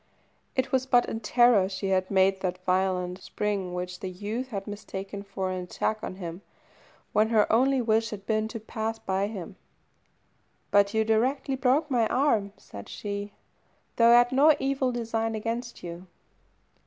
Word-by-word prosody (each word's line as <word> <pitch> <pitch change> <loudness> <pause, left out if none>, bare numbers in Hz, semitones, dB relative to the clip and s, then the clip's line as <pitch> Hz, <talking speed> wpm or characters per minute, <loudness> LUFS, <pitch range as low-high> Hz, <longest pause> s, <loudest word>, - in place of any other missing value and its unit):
It 260 0 0
was 260 0 +1
but 245 -2 +4
in 225 - -3
terror 230 -3 +4
she 195 0 -3
had 185 -1 +1
made 190 0 +3
that 180 -1 -2
violent 185 -1 0
spring 195 -4 -3
which 180 0 -5
the 190 - -4
youth 210 +7 -4
had 200 -6 -5
mistaken 200 -1 -6
for 195 -2 -4
an 185 0 -3
attack 215 +4 -2
on - - -5
him, 175 -1 -7 0.7
when 215 +1 +3
her 220 -2 +4
only 260 +2 +3
wish 225 0 +2
had 200 -2 -8
been 215 0 0
to 225 +1 -6
pass 220 +1 -4
by 195 -1 -1
him. 200 -5 -7 1.1
"But 200 +1 +4
you 220 - +3
directly 260 +5 +1
broke 275 +4 +1
my 245 -2 +3
right - - -7
arm," 225 -7 +2
said 100 -1 -11
she, 205 0 -5 0.6
"though 230 0 +6
I 240 - +8
had 245 +1 +4
no 290 +4 +6
evil 270 -1 0
design 225 -2 -2
against 235 +2 -4
you." 175 +1 -8
215 Hz, 170 wpm, -27 LUFS, 190-240 Hz, 1.1 s, I